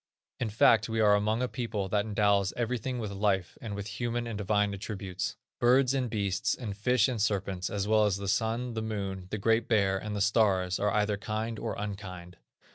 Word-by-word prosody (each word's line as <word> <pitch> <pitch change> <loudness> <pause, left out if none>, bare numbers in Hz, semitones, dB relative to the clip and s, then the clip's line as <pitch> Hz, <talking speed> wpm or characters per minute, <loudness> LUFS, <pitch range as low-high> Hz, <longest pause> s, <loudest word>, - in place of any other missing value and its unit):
In 115 - -1
fact 110 +1 +4
we 110 0 -1
are 105 -2 +5
among 110 +4 +1
a - - +1
people 115 -6 -3
that 105 +1 +1
endows 100 -2 +2
everything 125 +1 -2
with 110 -4 -4
life, 95 -3 0
and 105 -3 -5
with 100 0 -5
human 120 +3 -3
and 115 -2 -4
divine 105 0 +1
attributes. 95 -2 -4 0.2
Birds, 130 +2 +4
and 130 -3 0
beasts, 100 0 0
and 105 -6 -5
fishes, 120 +2 +3
and 120 -5 -2
serpents, 100 -3 -1
as 100 0 -2
well 110 0 +4
as 100 -2 +1
the 100 0 -5
Sun, 115 +4 0
the 110 - -2
Moon, 100 -4 -4
the 105 - -3
Great 115 +3 +2
Bear, 100 -4 +2
and 105 +1 -5
the - - -2
stars, 100 -3 +2
are 105 - +2
either 105 0 +1
kind 110 +2 -3
or - - -3
unkind. 95 -4 -6
105 Hz, 200 wpm, -29 LUFS, 100-115 Hz, 0.2 s, are